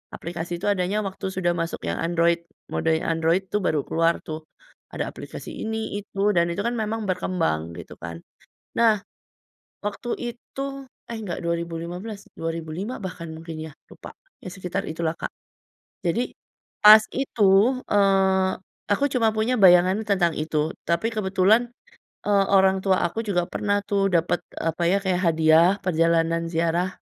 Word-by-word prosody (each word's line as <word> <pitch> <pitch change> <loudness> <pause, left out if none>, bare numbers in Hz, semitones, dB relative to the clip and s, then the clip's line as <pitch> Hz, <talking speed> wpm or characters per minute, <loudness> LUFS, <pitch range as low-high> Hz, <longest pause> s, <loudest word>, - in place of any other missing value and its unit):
aplikasi 170 +1 -5
itu 195 - -6
adanya 200 +2 0
waktu 190 -1 -6
sudah 175 -2 +1
masuk 165 -1 -3
yang - - -2
Android 170 0 +1 0.2
mode 165 - 0
yang 160 - -1
Android 165 +4 +2
tuh 210 - +1
baru 155 -6 0
keluar 165 +1 +1
tuh, 155 -1 -7 0.4
ada - - -3
aplikasi - - -9
ini, 220 -2 -3
itu, 205 0 0
dan 170 -3 +2
itu 185 +4 -2
kan 235 - 0
memang 220 -1 -2
berkembang 125 - -1
gitu 85 -1 -9
kan, 85 -1 -8 0.5
nah, 225 -3 +4 0.9
waktu 210 +4 -4 0.2
itu 240 +3 -10 0.4
eh, 230 - -6
enggak 185 -5 -4
2015, 170 +5 -4
2005 165 +7 -4
bahkan 175 -3 -6
mungkin 160 0 -8
ya 155 - -11 0.2
lupa. - - -11 0.3
Ya - - -7
sekitar 180 -1 -4
itulah 160 0 -1
Kak, - - -5 0.7
jadi 220 +9 -1 0.5
pas 215 +1 +11 0.2
itu, 230 -7 +2 0.4
eee, 190 -2 +3 0.4
aku 240 +8 +3
cuma 230 -4 +3
punya 220 +4 +1
bayangan 185 -1 +6
tentang 185 -5 +2
itu 155 0 -1
tapi 170 +6 +1
kebetulan, 195 +2 +3 0.7
eee, 200 -1 +4
orang 190 0 +5
tua 190 -1 +3
aku 195 - -6
juga 180 -4 +1
pernah 205 0 0
tuh 200 -1 +2
dapet 175 +1 +2 0.2
apa 165 +1 -1
ya 195 - +4
kayak 185 -2 0
hadiah 160 +2 +5
perjalanan 165 -1 +2
ziarah, 170 +3 0
180 Hz, 150 wpm, -24 LUFS, 165-205 Hz, 0.9 s, pas